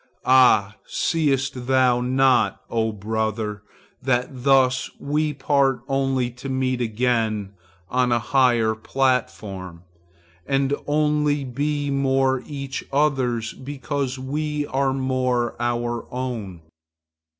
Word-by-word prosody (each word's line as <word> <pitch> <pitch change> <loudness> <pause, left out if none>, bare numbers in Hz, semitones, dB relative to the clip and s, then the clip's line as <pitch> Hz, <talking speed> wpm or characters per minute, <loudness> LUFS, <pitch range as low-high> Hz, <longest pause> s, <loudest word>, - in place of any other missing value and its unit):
Ah! 110 -5 +5
seest 135 -6 0
thou 130 -2 +3
not, 125 -4 +2
O 110 -1 +1
brother, 110 0 -3 0.4
that 125 -1 +1
thus 130 -1 +3
we 150 +2 0
part 135 -2 +1
only 135 -2 0
to 125 +3 -8
meet 130 -1 0
again 110 -3 0 0.3
on 125 +3 +1
a 120 - +4
higher 120 -2 +2
platform, 110 -8 -2 0.6
and 135 0 +1
only 150 -1 +1
be 145 +3 -2
more 135 -1 +2
each 140 -2 -5
other's 130 -6 +1
because 135 -1 -4
we 150 +3 -2
are 135 0 +1
more 130 -3 0
our 120 -1 -2
own? 115 -9 -5
130 Hz, 105 wpm, -23 LUFS, 120-135 Hz, 0.6 s, Ah